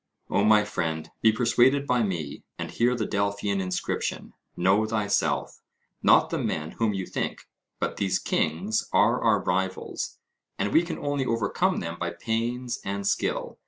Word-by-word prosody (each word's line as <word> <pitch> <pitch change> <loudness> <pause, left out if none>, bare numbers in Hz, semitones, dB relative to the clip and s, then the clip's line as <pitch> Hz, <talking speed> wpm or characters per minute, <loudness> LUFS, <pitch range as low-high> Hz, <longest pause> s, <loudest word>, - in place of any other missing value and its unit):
O 100 - +3
my 105 0 +5
friend, 80 -6 -3
be 110 - +6
persuaded 125 +4 +3
by 125 -3 +2
me, 85 -9 -3
and - - -5
hear 120 +1 +2
the - - -1
Delphian 100 -1 -1
inscription, 90 -1 -3 0.2
'Know 95 +5 +3
thyself' 105 -2 0 0.4
not - - +5
the - - -1
men 75 +1 -2
whom 110 -3 0
you 95 -1 -3
think, - - -4 0.3
but - - -2
these 95 -2 +1
kings 95 +8 -1
are 105 +6 +3
our 110 -3 +3
rivals, 95 +1 -2 0.4
and 105 - -1
we 160 - +6
can 175 0 -4
only 145 -2 -1
overcome 115 -2 +1
them 85 +1 -5
by 85 - -1
pains 120 +6 -2
and 100 0 -3
skill. - - -1
105 Hz, 160 wpm, -26 LUFS, 95-115 Hz, 0.4 s, be